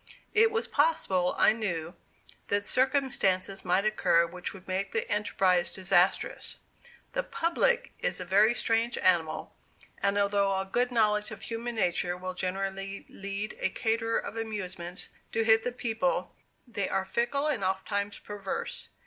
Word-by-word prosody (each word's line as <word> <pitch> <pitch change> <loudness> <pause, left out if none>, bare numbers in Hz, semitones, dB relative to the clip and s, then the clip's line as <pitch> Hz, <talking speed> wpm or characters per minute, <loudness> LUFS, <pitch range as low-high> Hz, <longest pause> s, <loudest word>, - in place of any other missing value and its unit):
It 450 0 +6
was 450 +1 -1
possible, 195 - +2
I - - +6
knew, 175 -7 -3 0.5
that 205 0 +1
circumstances 250 -8 +1
might 190 +3 +2
occur 170 -5 +3
which 175 +1 -5
would 190 -1 -13
make 190 +1 -2
the 225 - -1
enterprise 190 -4 +2
disastrous. 185 -1 +1 0.6
"The - - +1
public" 480 +6 +1
is - - -1
a 180 - -4
very 205 +6 +4
strange 230 +1 +1
animal, 165 -3 +1 0.5
and 200 0 +2
although 200 -1 +2
a 190 0 -1
good 245 +6 0
knowledge 210 -3 +2
of - - -9
human 235 +1 -4
nature 175 -3 0
will 185 0 -5
generally 195 +1 -4
lead 200 +2 -5
a - - +2
caterer 225 -1 0
of 225 - -5
amusements 185 -5 -4 0.2
to 225 - +2
hit 220 0 +5
the 250 - -1
people, 240 +2 -1 0.3
they 210 -6 -2
are 190 - 0
fickle, 240 +8 0
and 275 -10 0
ofttimes 200 +2 -1
perverse. 205 -2 -5
205 Hz, 150 wpm, -29 LUFS, 190-230 Hz, 0.6 s, It